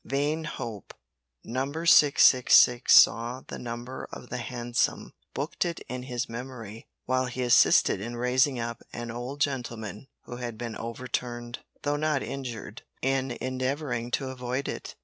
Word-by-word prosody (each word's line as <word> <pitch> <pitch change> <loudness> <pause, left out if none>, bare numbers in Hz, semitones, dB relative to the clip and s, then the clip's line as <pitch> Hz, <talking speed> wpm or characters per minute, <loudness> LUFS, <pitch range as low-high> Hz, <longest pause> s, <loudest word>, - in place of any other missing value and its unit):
Vain 150 +3 -1
hope! 115 - -7 0.5
Number 135 +7 -3
666 130 -5 +6
saw 120 +3 +6
the - - -8
number 120 +2 -6
of 125 - -9
the 125 - -3
hansom, 120 0 -2 0.2
booked 140 +4 -1
it 170 -2 -4
in 125 0 -6
his 125 -2 -3
memory 115 -2 -8 0.2
while 130 0 +1
he 125 +1 -3
assisted 120 -5 +5
in 120 +3 -5
raising 125 +2 +2
up 115 0 -4
an 120 0 -5
old 125 +4 -6
gentleman 120 -5 -3 0.2
who 120 - -8
had 120 -2 -5
been 115 -1 -5
overturned, 120 0 -4 0.2
though 145 0 0
not 155 -2 0
injured, 120 -6 -6 0.2
in 135 -2 0
endeavouring 130 -1 -2
to 130 +2 -1
avoid 130 +1 -3
it. - - -6
125 Hz, 145 wpm, -27 LUFS, 120-135 Hz, 0.5 s, 666